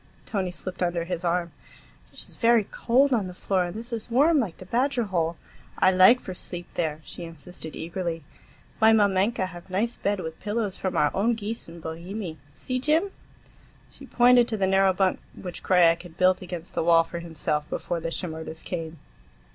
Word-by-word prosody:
Tony 195 -4 -2
slipped 180 +1 -6
under 175 -1 0
his 175 0 -4
arm. 170 -1 0 0.6
"It - - -11
is - - -11
very 230 -2 +4
cold 260 +7 +2
on 210 -6 +1
the 180 - -9
floor, 185 -1 0
and 175 +2 -6
this 235 +2 -5
is 230 +1 -4
warm 290 +6 +4
like 205 -10 -2
the 185 - -11
badger 245 +4 +1
hole. 170 -5 -1 0.4
I 185 - +5
like 190 +7 +7
for 185 - -7
sleep 175 -1 -6
there," 155 -2 -2
she 175 - -8
insisted 165 0 -9
eagerly. 170 -1 -4 0.6
"My 220 0 +6
mamenka 200 0 +2
have 175 0 -12
nice 215 +6 -1
bed, 200 0 -1
with 160 -2 -6
pillows 210 -1 -2
from 190 - -3
our 150 - +3
own 230 +5 +2
geese 225 +1 -5
in 170 +1 -10
Bohemie. 170 +2 -6
See, 255 - -3
Jim?" 315 +8 +2 0.8
She 275 - -13
pointed 245 -1 +5
to 220 - -2
the 195 - +2
narrow 195 0 +4
bunk 185 0 +1 0.2
which 180 -2 -7
Krajiek 170 -2 +4
had 175 -2 -13
built 185 0 +3
against 175 -2 -6
the - - 0
wall 165 0 +5
for 170 +1 -7
himself 155 -3 -2
before 175 - -3
the 165 0 -3
Shimerdas 160 -2 -5
came. 165 -2 -5
185 Hz, 190 wpm, -26 LUFS, 170-220 Hz, 0.8 s, like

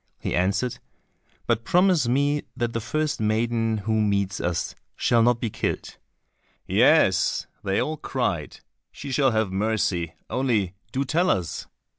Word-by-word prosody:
He - - -3
answered, 95 +7 0 0.7
"But 115 -1 0
promise 180 -3 +3
me 145 +4 +2 0.2
that 120 -2 -1
the 115 - -2
first 155 +6 -1
maiden 115 +1 +1
who 110 0 +2
meets 100 -1 0
us 85 -1 -2 0.2
shall 120 -1 +3
not 120 0 +3
be 115 -3 -2
killed." - - -3 0.7
"Yes," - - +3 0.2
they 95 0 0
all 155 +1 -1
cried, - - -3 0.3
"she 140 - -7
shall 135 0 +3
have 110 -4 0
mercy, 95 -5 0
only 115 -8 0 0.2
do 135 +3 -1
tell 170 +6 +1
us." 90 -4 -1
115 Hz, 140 wpm, -25 LUFS, 100-135 Hz, 0.7 s, promise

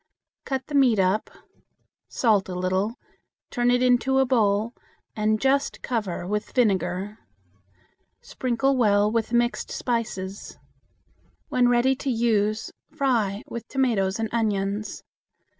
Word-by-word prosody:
Cut 265 -1 -3
the 295 - -10
meat 260 -6 +4
up, 190 +3 +1 0.8
salt 210 -6 +1
a 180 - -4
little, 185 +5 -1 0.6
turn 245 -1 +1
it 245 0 +3
into 250 +1 +3
a 265 - +4
bowl, 220 -2 +1 0.4
and 215 0 +1
just 275 +2 0
cover 210 -8 -2
with 210 +3 -3
vinegar. 195 -2 0 1.0
Sprinkle 255 +2 -1
well 210 -3 +3
with 230 0 -1
mixed 240 0 0
spices. 205 -5 -4 0.9
When 250 -1 +3
ready 245 +2 +3
to 275 - -3
use, 220 -2 0 0.2
fry 225 -7 0
with 235 0 -7
tomatoes 220 -8 0
and 225 0 -1
onions. 210 -2 -2
225 Hz, 120 wpm, -25 LUFS, 200-245 Hz, 1.0 s, meat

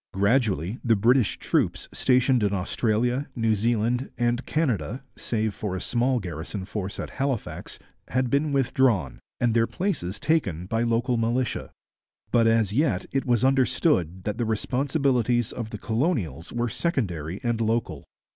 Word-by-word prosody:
Gradually 100 - +1
the 115 -2 +4
British 120 +2 +3
troops - - 0
stationed 125 -1 +3
in 100 -1 +1
Australia, 120 +7 0
New 115 -2 +2
Zealand, 115 +4 0
and 120 +1 +1
Canada 125 - -1
(save 110 -2 -1
for 105 -5 -4
a - - -2
small 125 +4 +1
garrison 90 +1 -5
force 100 -1 -5
at - - -5
Halifax) 135 -4 -3 0.3
had 130 -1 0
been 145 +2 +2
withdrawn, 130 - +1 0.2
and 120 -2 +2
their 115 0 +3
places 135 - -2
taken 100 - 0
by 115 +4 -1
local 120 +1 +1
militia. 115 +2 -1 0.6
But 115 -2 +4
as 115 -3 +2
yet 120 - +1
it 135 -1 -1
was 120 0 +3
understood 125 - +2
that 105 +2 -3
the 120 - +1
responsibilities 125 0 +1
of 115 -2 -5
the 110 - -6
colonies 110 - -1
were 120 0 -1
secondary 95 - -2
and 120 -1 0
local. 115 +1 -1
115 Hz, 145 wpm, -25 LUFS, 105-130 Hz, 0.6 s, the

